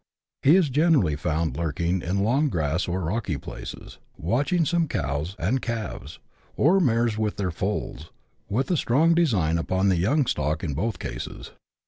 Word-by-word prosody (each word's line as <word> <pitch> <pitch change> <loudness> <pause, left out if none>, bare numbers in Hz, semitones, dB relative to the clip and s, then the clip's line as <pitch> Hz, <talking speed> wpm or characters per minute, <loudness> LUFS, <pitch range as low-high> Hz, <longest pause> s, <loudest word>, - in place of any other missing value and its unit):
He 150 +5 +6
is 180 -6 +3
generally 145 - +3
found 80 +1 -1
lurk 85 -4 -3
ing 85 +2 +1
in 95 +4 -1
long 135 +8 +2
grass 80 - -1
or 90 +2 -2
rocky 90 -2 -2
places, - - -9 0.2
watching 145 - +1
some 170 0 +1
cows 75 - -2
and 115 +10 0
calves, 110 - -5 0.4
or 180 +7 +4
mares 115 - +1
with 105 -1 -1
their 95 -3 -1
foals, 90 -2 -4 0.4
with 130 - 0
a 175 - +2
strong 150 +7 +3
design 100 - +2
upon 95 +3 +1
the 95 - +2
young 135 - +2
stock 75 - -1
in 75 -5 -2
both 105 +10 -2
cases. - - -7
100 Hz, 165 wpm, -25 LUFS, 85-135 Hz, 0.4 s, He